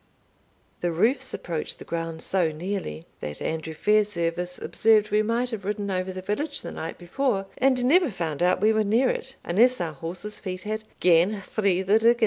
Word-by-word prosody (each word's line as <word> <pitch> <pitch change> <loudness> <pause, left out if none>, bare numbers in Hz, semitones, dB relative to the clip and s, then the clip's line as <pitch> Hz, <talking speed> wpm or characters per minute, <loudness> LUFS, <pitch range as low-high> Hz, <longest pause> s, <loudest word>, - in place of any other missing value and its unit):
The 175 - 0
roofs 250 - +1
approached 165 -3 -3
the - - -11
ground 165 -1 -4
so 180 -4 +1
nearly, 155 - -4
that 75 0 -5
Andrew 160 0 -3
Fairservice 180 -3 +1
observed 215 -2 +3
we 210 +1 +4
might 235 +3 0
have 215 -3 -5
ridden 205 0 -2
over 185 0 -1
the 185 0 -7
village 280 +10 -2
the - - -5
night 160 - -6
before, 195 +3 -1
and 255 -1 +3
never 340 +4 +5
found 165 - -3
out 180 +1 +3
we 220 +1 +4
were 215 0 +2
near 230 +5 +3
it, 265 +1 -5
unless 240 +8 +3
our 165 -3 -2
horses' 175 +8 -6
feet 185 -1 -5
had 215 +1 -4 0.2
"gane 180 +4 +4
through 195 -2 0
the 205 +3 +4
riggin'." 230 +2 +5
200 Hz, 185 wpm, -26 LUFS, 170-220 Hz, 0.2 s, never